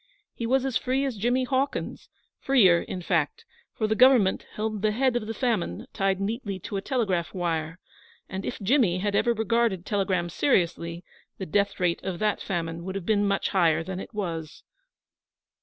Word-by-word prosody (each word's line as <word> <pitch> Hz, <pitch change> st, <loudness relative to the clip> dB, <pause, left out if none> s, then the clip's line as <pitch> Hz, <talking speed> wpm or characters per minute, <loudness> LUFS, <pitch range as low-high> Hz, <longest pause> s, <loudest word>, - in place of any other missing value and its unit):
He 230 Hz, -, -4 dB
was 265 Hz, +2 st, +2 dB
as 265 Hz, -3 st, +1 dB
free 265 Hz, +2 st, 0 dB
as 265 Hz, -4 st, -2 dB
Jimmy 245 Hz, +5 st, +1 dB
Hawkins 265 Hz, +2 st, -2 dB, 0.3 s
freer, 195 Hz, -11 st, +5 dB
in 180 Hz, -, -6 dB
fact, 165 Hz, -5 st, 0 dB, 0.3 s
for 220 Hz, -, -2 dB
the 215 Hz, -, +1 dB
Government 235 Hz, -4 st, +4 dB
held 215 Hz, -1 st, -2 dB
the 215 Hz, -, +3 dB
Head 255 Hz, +2 st, +1 dB
of 225 Hz, -3 st, -1 dB
the 225 Hz, -, -3 dB
Famine 215 Hz, -, -1 dB
tied 195 Hz, -1 st, 0 dB
neatly 205 Hz, 0 st, -3 dB
to 200 Hz, -, -6 dB
a 195 Hz, -, -1 dB
telegraph 195 Hz, -, -1 dB
wire, 165 Hz, -2 st, -2 dB, 0.5 s
and 190 Hz, +1 st, -5 dB
if -, -, -4 dB
Jimmy 210 Hz, -4 st, +3 dB
had 200 Hz, +2 st, -1 dB
ever 240 Hz, -, +3 dB
regarded 225 Hz, -4 st, +1 dB
telegrams 185 Hz, -4 st, -1 dB
seriously, 170 Hz, -, 0 dB, 0.3 s
the 190 Hz, -, -5 dB
death 200 Hz, +4 st, 0 dB
rate 175 Hz, -2 st, 0 dB
of 190 Hz, -2 st, -3 dB
that 210 Hz, +3 st, 0 dB
famine 165 Hz, -2 st, -3 dB
would 190 Hz, +1 st, -5 dB
have 195 Hz, -3 st, -4 dB
been 205 Hz, 0 st, +2 dB
much 200 Hz, -1 st, 0 dB
higher 170 Hz, -4 st, +3 dB
than 185 Hz, +1 st, -5 dB
it -, -, -8 dB
was. 170 Hz, -7 st, -5 dB
200 Hz, 180 wpm, -26 LUFS, 175-230 Hz, 0.5 s, freer